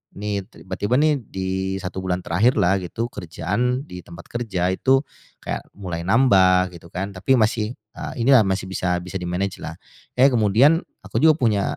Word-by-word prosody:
nih 100 -1 -3
tiba-tiba 100 +5 -3
nih 150 0 +3
di 95 0 -3
1 95 0 -5
bulan 90 -1 -2
terakhirlah 95 0 +2
gitu 115 +7 -4
kerjaan 105 - -2
di 90 -11 -9
tempat 85 -1 -12
kerja 95 -7 -1
itu 135 +8 +2 0.4
kayak - - -4
mulai 90 -4 -5
nambah 95 -6 +4
gitu 85 0 -13
kan. 95 +3 -4
Tapi 130 +8 +2
masih, 110 +1 0 0.2
eee, - - -6
inilah 130 -3 +6
masih 95 0 -1
bisa 90 -1 -1
bisa 95 +1 -5
di-manage-lah, 90 +2 -4 0.4
eee, 135 +1 +6
kemudian 120 +8 +4 0.2
aku - - -2
juga 155 0 +5
punya, 110 -8 +1
100 Hz, 160 wpm, -22 LUFS, 90-120 Hz, 0.4 s, inilah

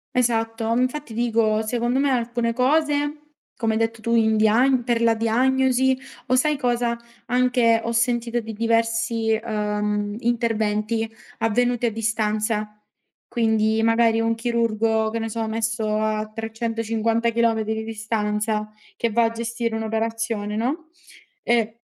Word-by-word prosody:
Esatto, 225 -2 0
infatti, 255 -2 -2
dico, 225 -2 +1
secondo 240 +2 0
me, 275 0 +2
alcune 235 -1 0
cose, 295 +2 0 0.3
come 225 -2 0
hai 220 - 0
detto 225 0 -1
tu, 230 +1 -1
in 220 -1 +3
diagn 245 +4 +3
per 235 -1 0
la 230 -1 +4
diagnosi 260 +3 +2 0.3
o, 255 - +3
sai 300 +3 +2
cosa? 240 -3 0 0.3
Anche, 245 -2 +3
ho 230 - -2
sentito 235 0 +1
di 225 -1 -7
diversi, 230 0 +1
uhm, 210 -1 -2
interventi 225 -2 0 0.3
avvenuti 240 +2 +1
a - - -1
distanza. 215 -1 -1 0.5
Quindi, 220 -2 +1
magari, 225 0 +3
un 225 0 +1
chirurgo, 225 -2 0
che 230 - -3
ne 225 0 -3
so, 225 0 -3
messo 220 -1 -1
a 215 0 -1
350 225 0 -1
chilometri 225 -1 +1
di 220 0 -3
distanza 215 -1 -2 0.2
che 235 - -1
va 235 +2 +3
a 225 - +2
gestire 230 0 -3
un'operazione, 225 -1 -2
no, 300 +9 -2 0.5
ehm, 230 -2 +1
230 Hz, 135 wpm, -23 LUFS, 220-240 Hz, 0.5 s, la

